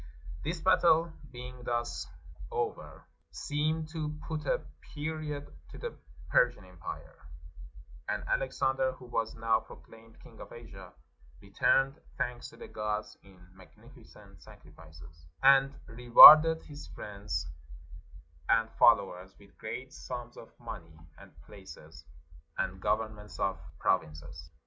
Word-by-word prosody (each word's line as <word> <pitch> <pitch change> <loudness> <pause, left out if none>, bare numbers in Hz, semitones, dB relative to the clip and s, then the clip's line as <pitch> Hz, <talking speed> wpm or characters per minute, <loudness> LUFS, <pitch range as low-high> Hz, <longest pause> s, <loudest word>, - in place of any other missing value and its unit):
This 165 +3 -3
battle 170 -2 +3 0.2
being 125 0 -10
thus 120 -1 -3 0.4
over, 445 -1 -5 0.2
seemed 155 +2 -2
to 155 -2 -4
put 155 -3 -5
a - - +1 0.3
period 150 -1 -4 0.2
to - - -12
the 485 - -6 0.4
Persian 120 -5 +2
empire; 90 -1 -10 0.9
and - - -2
Alexander, 135 0 0
who 130 - -14
was 115 -2 -3
now 115 0 +1
proclaimed 115 0 -16
king - - -16
of - - -11
Asia, - - -12 0.5
returned 135 +2 +1 0.2
thanks 120 0 -4
to 115 - -17
the - - -10
gods 105 0 -4
in 95 -1 -19 0.2
magnificent 95 -1 -18
sacrifices, 75 0 -16 0.2
and 135 0 +5
rewarded 150 +7 +9
his 145 - -11
friends 100 0 -6 1.0
and 115 0 +2
fol 115 - +8
lowers 95 -2 -10
with 100 -1 -20
great 130 +4 -7
sums 120 -1 -8
of 115 - -12
money, 90 -9 -10 0.2
and - - -15
places, - - -14 0.5
and 95 0 -3
gov 110 +2 0
ernments 105 -1 -13
of 95 -4 -1 0.2
provinces. 75 0 -2
120 Hz, 120 wpm, -30 LUFS, 100-145 Hz, 1.0 s, rewarded